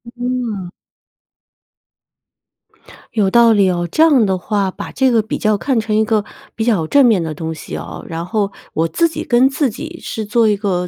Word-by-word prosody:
嗯。 240 -7 -3 2.4
有 205 -4 +2
道 235 +2 +5
理 200 -3 +3
哦， 175 -1 -1
这 - - +1
样 290 -8 +5
的 190 -2 0
话， 200 0 -1
把 - - -8
这 265 -1 +2
个 230 -2 +3
比 215 - -4
较 215 -1 +1
看 250 +4 0
成 215 -1 -1
一 215 - +3
个 215 -1 0 0.3
比 220 - -2
较 200 -10 +1
正 280 - +5
面 220 -7 +3
的 160 -2 -4
东 160 +1 -4
西 160 - -7
哦， - - -8
然 165 0 -4
后 200 +2 -1 0.2
我 165 +1 +1
自 335 - +1
己 315 -1 -5
跟 250 0 +3
自 270 0 0
己 320 +9 -8
是 220 - -5
做 225 +2 +2
一 205 - +1
个 185 -3 -1
215 Hz, 210 characters per minute, -17 LUFS, 190-245 Hz, 2.4 s, 道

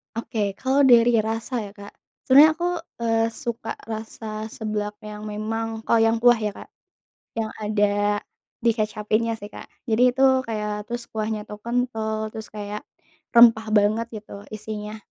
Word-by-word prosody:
Oke, 230 -1 -4 0.2
kalau 265 +5 +1
dari 240 -1 +6
rasa 225 +3 -2
ya 205 -2 -6
Kak, 200 -1 -11 0.3
sebenernya 295 +4 +7
aku, 350 +1 -1 0.2
eee, 225 0 +2 0.2
suka 235 -3 -4
rasa 220 -1 -6
seblak 210 -1 -4
yang 210 0 -7
memang, 225 +1 -3
kalo 230 - +3
yang 225 0 +4
kuah 240 -2 +6
ya 210 -1 -1
Kak, - - -11 0.7
yang 220 -1 -1
ada 205 -1 +1 0.5
dikecapinnya 220 0 0
sih 205 0 -10
Kak. - - -10 0.2
Jadi 225 -1 +1
itu 255 +2 -2 0.2
kayak 210 -3 -4
terus 240 0 -4
kuahnya 215 -1 -2
tuh 210 -1 -10
kental, 220 -3 -2
terus 220 -1 -7
kayak 210 0 -6 0.5
rempah 230 -2 +7
banget 215 +3 +2
gitu 210 - -13 0.2
isinya. 215 0 -6
220 Hz, 145 wpm, -24 LUFS, 210-230 Hz, 0.7 s, sebenernya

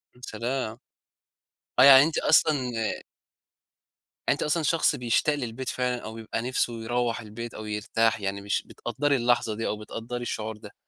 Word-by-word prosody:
يا 125 - -21
سلام! 120 0 -3 1.0
آه 130 - +9
يعني 135 0 +10
أنتِ 160 +1 -1
أصلًا 155 0 +4 1.7
يعني - - +5
أنتِ - - 0
أصلًا 160 +2 0
شخص 165 +2 +2
بيشتاق 125 +4 +1
للبيت 125 -1 -4
فعلًا، 125 -1 -1
أو 110 +1 -7
ييبقى 115 0 -4
نفسه 120 -2 -1
يروح 120 0 -1
البيت، 115 +2 -8
أو 110 - -7
يرتاح 105 +1 0
يعني 100 0 -3
مش 100 0 -1
بتقدري 140 +4 -1
اللحظة 120 -3 +1
دي، 115 - -3
أو 105 - -2
بتقدري 115 +3 -6
الشعور 110 -2 -4
ده؟ - - -12
120 Hz, 160 wpm, -26 LUFS, 110-130 Hz, 1.7 s, يعني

